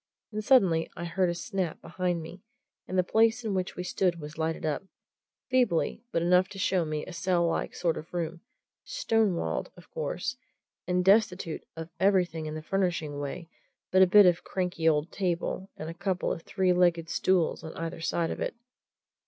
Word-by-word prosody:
And 215 Hz, 0 st, -3 dB
suddenly 190 Hz, -10 st, +4 dB
I 175 Hz, -, -4 dB
heard 180 Hz, +1 st, +1 dB
a 175 Hz, -, -1 dB
snap 185 Hz, -2 st, -3 dB
behind 175 Hz, 0 st, -2 dB
me, 175 Hz, +3 st, -10 dB, 0.5 s
and 185 Hz, -, -2 dB
the 185 Hz, -, +4 dB
place 225 Hz, +5 st, +3 dB
in 210 Hz, -, -1 dB
which 185 Hz, -1 st, -2 dB
we 180 Hz, -, -4 dB
stood 180 Hz, -1 st, 0 dB
was 150 Hz, 0 st, -8 dB
lighted 160 Hz, 0 st, -2 dB
up 150 Hz, -2 st, -1 dB, 0.7 s
feebly, 240 Hz, -6 st, +2 dB
but 165 Hz, -, 0 dB
enough 180 Hz, +2 st, +4 dB
to 195 Hz, -, -10 dB
show 185 Hz, -2 st, +1 dB
me 155 Hz, -1 st, -3 dB
a 185 Hz, -, -9 dB
cell 175 Hz, 0 st, +1 dB
like 165 Hz, -, -2 dB
sort 170 Hz, -2 st, 0 dB
of 160 Hz, -, -12 dB
room, 170 Hz, -1 st, -3 dB, 0.4 s
stone 225 Hz, -, +1 dB
walled, -, -, -2 dB
of 175 Hz, -, -16 dB
course, 180 Hz, -, -3 dB, 0.5 s
and 180 Hz, 0 st, +1 dB
destitute 195 Hz, -5 st, +3 dB
of 165 Hz, +1 st, -7 dB
everything 180 Hz, -5 st, +2 dB
in 155 Hz, -, -5 dB
the 155 Hz, -, -6 dB
furnishing 170 Hz, -5 st, -1 dB
way 155 Hz, +4 st, -5 dB, 0.4 s
but 185 Hz, -, +5 dB
a 190 Hz, -, +8 dB
bit 205 Hz, +2 st, +8 dB
of 175 Hz, -1 st, +4 dB
a -, -, -26 dB
cranky 180 Hz, -3 st, 0 dB
old 150 Hz, +1 st, 0 dB
table 185 Hz, 0 st, -2 dB
and 155 Hz, -, -6 dB
a 165 Hz, -, -5 dB
couple 185 Hz, +1 st, -1 dB
of -, -, -7 dB
three 185 Hz, 0 st, +1 dB
legged 175 Hz, -2 st, +3 dB
stools 180 Hz, 0 st, +1 dB
on 160 Hz, -, -6 dB
either 165 Hz, 0 st, -5 dB
side 165 Hz, 0 st, 0 dB
of -, -, -5 dB
it. -, -, -2 dB
180 Hz, 195 wpm, -28 LUFS, 165-190 Hz, 0.7 s, a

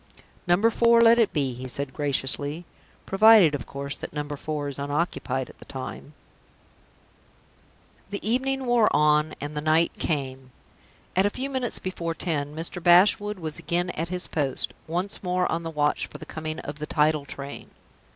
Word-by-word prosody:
"Number 195 Hz, +6 st, +4 dB
Four 235 Hz, 0 st, +4 dB
let 230 Hz, 0 st, +6 dB
it 225 Hz, -, +3 dB
be," 140 Hz, -5 st, -1 dB
he 130 Hz, +2 st, -7 dB
said, 135 Hz, +1 st, -2 dB
graciously. 145 Hz, +2 st, -1 dB, 0.4 s
"Provided, 200 Hz, -5 st, +6 dB
of 145 Hz, -, -4 dB
course, 140 Hz, +1 st, -4 dB
that -, -, -8 dB
Number 145 Hz, 0 st, -4 dB
Four 150 Hz, 0 st, -4 dB
is 140 Hz, -1 st, -6 dB
unoccupied 140 Hz, -3 st, -2 dB
at -, -, -16 dB
the -, -, -13 dB
time." 135 Hz, +2 st, -8 dB, 1.9 s
The 200 Hz, +1 st, -4 dB
evening 265 Hz, +3 st, 0 dB
wore 240 Hz, -3 st, +4 dB
on, 150 Hz, +1 st, +3 dB
and 145 Hz, +1 st, -6 dB
the 150 Hz, -, -2 dB
night 155 Hz, +2 st, +3 dB
came. 135 Hz, -4 st, -3 dB, 0.7 s
At 190 Hz, +2 st, +4 dB
a -, -, +1 dB
few 260 Hz, +6 st, -5 dB
minutes 255 Hz, -3 st, -2 dB
before 170 Hz, -3 st, -4 dB
ten, 150 Hz, -4 st, -3 dB
Mr. 165 Hz, +2 st, -4 dB
Bashwood 205 Hz, +4 st, +5 dB
was 160 Hz, -4 st, -5 dB
again 175 Hz, +1 st, -1 dB
at 165 Hz, 0 st, -3 dB
his 180 Hz, 0 st, -2 dB
post, 140 Hz, -4 st, -2 dB
once 180 Hz, +5 st, -3 dB
more 180 Hz, -1 st, 0 dB
on 165 Hz, -, -1 dB
the 165 Hz, -, -5 dB
watch 150 Hz, -2 st, 0 dB
for -, -, -10 dB
the -, -, -10 dB
coming 155 Hz, 0 st, -5 dB
of 145 Hz, +1 st, -7 dB
the 150 Hz, -, -4 dB
tidal 150 Hz, -1 st, +2 dB
train. 140 Hz, 0 st, -8 dB
160 Hz, 170 wpm, -25 LUFS, 145-185 Hz, 1.9 s, let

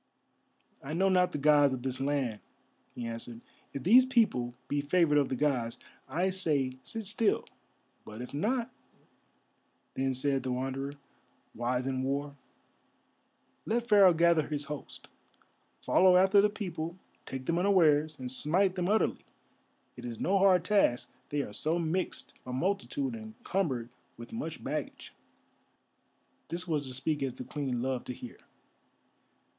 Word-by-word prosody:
"I 150 Hz, +3 st, -5 dB
know 190 Hz, +3 st, +3 dB
not 180 Hz, -1 st, +3 dB
the -, -, -3 dB
Gods 145 Hz, -1 st, +4 dB
of 125 Hz, -, -9 dB
this 130 Hz, -1 st, -2 dB
land," 135 Hz, -6 st, -1 dB, 0.6 s
he 120 Hz, -, -5 dB
answered. 115 Hz, 0 st, -6 dB, 0.3 s
"If 140 Hz, -, -6 dB
these 240 Hz, +8 st, +7 dB
people 215 Hz, -, +1 dB
be 145 Hz, 0 st, 0 dB
favoured 150 Hz, 0 st, +3 dB
of 140 Hz, -, +1 dB
the 130 Hz, -, -1 dB
Gods, 125 Hz, -5 st, 0 dB, 0.3 s
I 185 Hz, +3 st, 0 dB
say 145 Hz, -9 st, 0 dB
sit 220 Hz, -, -5 dB
still. 215 Hz, +2 st, +1 dB, 0.6 s
But 110 Hz, +1 st, -10 dB
if 125 Hz, +2 st, -7 dB
not," 235 Hz, -, -1 dB, 1.2 s
then 135 Hz, 0 st, -1 dB
said 135 Hz, +1 st, +1 dB
the 130 Hz, -, -3 dB
Wanderer, 135 Hz, +2 st, -3 dB, 0.6 s
wise 125 Hz, +2 st, -1 dB
in 130 Hz, -1 st, -1 dB
war, 140 Hz, +2 st, -2 dB, 1.3 s
"let 235 Hz, +2 st, 0 dB
Pharaoh 195 Hz, -4 st, +6 dB
gather 170 Hz, -2 st, +3 dB
his 150 Hz, -1 st, -2 dB
host, 150 Hz, 0 st, -8 dB, 0.7 s
follow 185 Hz, -1 st, +5 dB
after 195 Hz, +2 st, +6 dB
the 210 Hz, -, +3 dB
people, 175 Hz, -5 st, -5 dB, 0.3 s
take 130 Hz, -1 st, -6 dB
them 170 Hz, +3 st, +1 dB
unawares, 155 Hz, -6 st, +3 dB
and 125 Hz, -1 st, -4 dB
smite 180 Hz, +8 st, +3 dB
them 180 Hz, -1 st, -1 dB
utterly. 215 Hz, +1 st, +1 dB, 0.7 s
It 120 Hz, -, -10 dB
is 120 Hz, -2 st, -6 dB
no 195 Hz, +1 st, +2 dB
hard 185 Hz, -3 st, +5 dB
task, 195 Hz, -, +2 dB, 0.2 s
they 145 Hz, -1 st, -1 dB
are 105 Hz, -, -9 dB
so 155 Hz, +9 st, 0 dB
mixed 170 Hz, +2 st, -2 dB
a 125 Hz, -, -7 dB
multitude 200 Hz, -, -1 dB
and 220 Hz, -1 st, -9 dB
cumbered 135 Hz, -12 st, -1 dB, 0.3 s
with 120 Hz, 0 st, -10 dB
much 165 Hz, -9 st, -5 dB
baggage!" 150 Hz, -1 st, -5 dB, 1.3 s
This 175 Hz, +2 st, -4 dB
was 150 Hz, -4 st, -1 dB
to 130 Hz, -, -4 dB
speak 150 Hz, +3 st, -1 dB
as 130 Hz, -2 st, -2 dB
the 125 Hz, -, -7 dB
Queen 130 Hz, -4 st, -3 dB
loved 130 Hz, -1 st, -2 dB
to 125 Hz, -, -3 dB
hear. 120 Hz, -, -10 dB
150 Hz, 150 wpm, -30 LUFS, 130-185 Hz, 1.3 s, these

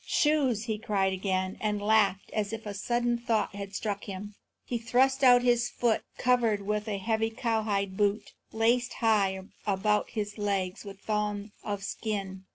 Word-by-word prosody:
"Shoes?" 280 Hz, -8 st, +2 dB
he 220 Hz, -2 st, -3 dB
cried 200 Hz, -4 st, +1 dB
again, 185 Hz, 0 st, -1 dB
and 210 Hz, -1 st, 0 dB
laughed 205 Hz, -2 st, +2 dB
as 210 Hz, -1 st, -1 dB
if 225 Hz, 0 st, -6 dB
a 205 Hz, -, -4 dB
sudden 240 Hz, +3 st, 0 dB
thought 225 Hz, -5 st, 0 dB
had 200 Hz, 0 st, -6 dB
struck 205 Hz, -2 st, -3 dB
him. 205 Hz, +1 st, -7 dB, 0.3 s
He 240 Hz, -, -2 dB
thrust 260 Hz, +4 st, +2 dB
out 245 Hz, -1 st, +7 dB
his 240 Hz, -1 st, +3 dB
foot, 235 Hz, -2 st, +1 dB, 0.2 s
covered 235 Hz, -5 st, +2 dB
with 210 Hz, +1 st, -1 dB
a 205 Hz, -2 st, -1 dB
heavy 220 Hz, +2 st, 0 dB
cowhide 220 Hz, -5 st, -1 dB
boot, 205 Hz, 0 st, 0 dB, 0.2 s
laced 235 Hz, +3 st, +2 dB
high 200 Hz, -4 st, +2 dB, 0.3 s
about 210 Hz, +1 st, +1 dB
his 210 Hz, -1 st, -4 dB
leg 195 Hz, -3 st, -1 dB
with 195 Hz, -1 st, -10 dB
thongs 210 Hz, -1 st, -2 dB
of 205 Hz, -2 st, -3 dB
skin. 195 Hz, -3 st, -4 dB
210 Hz, 165 wpm, -29 LUFS, 200-230 Hz, 0.3 s, out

